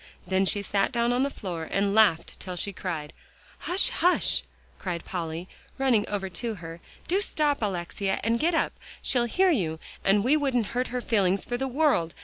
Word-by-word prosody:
Then 190 +1 +2
she 200 +1 +1
sat 200 0 +1
down 235 +1 +1
on 250 - +1
the 280 - +2
floor 175 - -5
and 200 0 +1
laughed 200 -7 +3
till 185 -1 -6
she 200 +3 -2
cried. 165 -6 -4 0.6
"Hush 360 +3 +4
hush!" 360 +1 +3 0.4
cried 175 -3 -4
Polly, 170 -1 -4 0.3
running 250 -6 +2
over 200 -2 -2
to 220 +5 -4
her, 165 -2 -9 0.3
"do 380 +4 +2
stop, 295 -8 +1
Alexia, 195 0 -2
and 230 +2 +1
get 330 +2 +2
up. - - +1 0.3
She'll 245 -2 +2
hear 370 +10 +3
you, 165 - 0 0.2
and 200 +1 +4
we 265 +6 +4
wouldn't 265 -6 +1
hurt 250 +1 0
her 250 0 -3
feelings 200 -5 +1
for 245 - -2
the 265 +2 -1
world. 265 - +1
205 Hz, 185 wpm, -27 LUFS, 180-255 Hz, 0.6 s, Hush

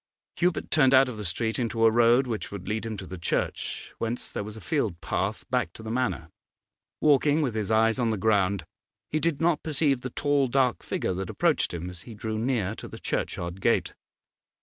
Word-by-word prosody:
Hubert 180 0 0
turned 135 -4 +5
out 130 0 +6
of 120 - -6
the 105 - -5
street 110 +7 -1
into 115 -1 +1
a 110 - +6
road 120 +3 +5
which 115 -4 -4
would 100 -3 -7
lead 110 +2 -2
him 110 -2 -4
to 95 - -7
the 90 -1 -8
church, 85 - -2
whence 115 +2 -2
there - - -3
was 105 +1 -7
a - - -7
field 110 - -1
path 95 +5 -2
back 125 -2 0
to 110 - -11
the 110 - -5
Manor. 120 -10 -1 0.7
Walking 150 +1 +4
with 125 -6 -1
his 110 -2 -2
eyes 110 +2 +3
on 120 -2 +2
the 110 - 0
ground 100 -3 +2 0.5
he 155 - +1
did 160 -3 0
not 165 -1 +2
perceive 145 -4 +1
the 130 - -4
tall, 145 +1 +1
dark 125 -1 +2
figure - - -2
that 95 +1 -4
approached - - +1
him 85 0 -5
as 90 -2 -7
he 115 - -10
drew 110 +1 -3
near 115 -5 0
to - - -8
the - - -9
churchyard 85 +2 -3
gate. - - +2
115 Hz, 215 wpm, -27 LUFS, 100-130 Hz, 0.7 s, out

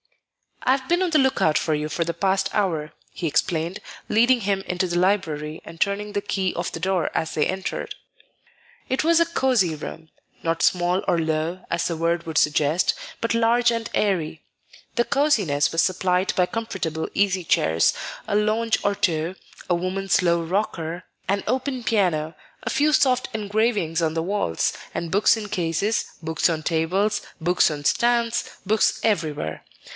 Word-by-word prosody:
"I've 260 +1 +1
been 350 +2 +2
on 365 - +1
the 310 -2 +3
lookout 265 - +3
for 160 - 0
you 150 0 -2
for 170 +3 -1
the 170 0 -3
past 190 +1 +1
hour," 165 -7 -1 0.2
he 175 - -5
explained, 165 +3 0 0.3
leading 240 +3 +4
him 195 -1 0
into 180 0 -2
the 175 0 -1
library 165 -5 0
and 165 0 -11
turning 205 +2 -1
the 205 - 0
key 190 -2 -1
of 175 - -3
the - - -6
door 185 -1 0
as 160 0 -1
they 150 - +1
entered. 190 0 -4 0.9
It 260 - 0
was 335 +1 +4
a 335 - +5
cosey 250 - +1
room, 160 +1 -8 0.3
not 165 0 0
small 180 +1 +2
or 170 - +2
low, 160 +3 -2
as 170 0 0
the 170 - -1
word 170 +1 0
would 160 -2 -3
suggest, 150 +3 +3 0.3
but 230 - 0
large 235 +1 +3
and 230 -1 -3
airy; 170 -6 0 0.5
the 240 - +3
cosiness 205 - +2
was 165 - +2
supplied 185 0 +1
by 180 - +3
comfortable 185 -9 -3
easy 190 -2 +1
chairs, 80 - +3 0.3
a 210 - 0
lounge 215 +2 +1
or 200 - +2
two, 165 -1 0 0.3
a 175 - +3
woman's 185 +3 0
low 170 -1 +3
rocker, 170 -1 -2 0.2
an 200 +1 0
open 255 +1 -1
piano, 170 -8 +1 0.3
a - - -2
few 300 +1 +3
soft 255 -4 +3
engravings 210 -5 0
on 160 -1 0
the 165 - 0
walls, 180 - 0 0.2
and 170 -1 -3
books 205 +3 +4
in 215 -1 -5
cases, 195 +3 0 0.2
books 160 +2 +1
on 160 -2 -2
tables, 185 +6 +1 0.2
books 175 +2 +3
on 145 -1 -5
stands, 235 +4 +2 0.2
books 215 +2 +2
everywhere. 155 - -1
185 Hz, 170 wpm, -23 LUFS, 165-215 Hz, 0.9 s, a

